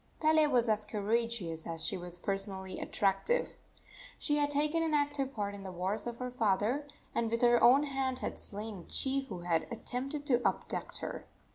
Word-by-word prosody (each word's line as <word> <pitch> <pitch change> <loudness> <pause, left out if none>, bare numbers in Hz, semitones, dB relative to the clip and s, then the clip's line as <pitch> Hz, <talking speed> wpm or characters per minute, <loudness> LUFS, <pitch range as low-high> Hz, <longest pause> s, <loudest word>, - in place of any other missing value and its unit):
Pele 310 -1 +5
was 245 -4 +3
as 215 -1 +2
courageous 210 -5 -1
as 165 -1 -1
she - - 0
was 175 -1 -4
personally 195 0 -3
attractive. 205 - +1 0.6
She 295 -1 +1
had 290 -1 +2
taken 300 +3 +1
an 320 -2 +1
active 290 -2 +1
part 205 -4 -3
in 200 - -8
the 190 -1 -6
wars 185 +6 -1
of 235 -1 -4
her 250 0 -4
father, 230 +5 +1 0.3
and 230 -1 0
with 230 +2 -1
her 240 0 +5
own 265 +4 +7
hand 270 -2 -1
had - - -4
slain 210 0 -4
a - - -10
chief 270 0 +1
who 180 -6 -7
attempted 250 - -2
to 245 -4 +3
abduct - - -1
her. - - -6
235 Hz, 180 wpm, -32 LUFS, 195-275 Hz, 0.6 s, own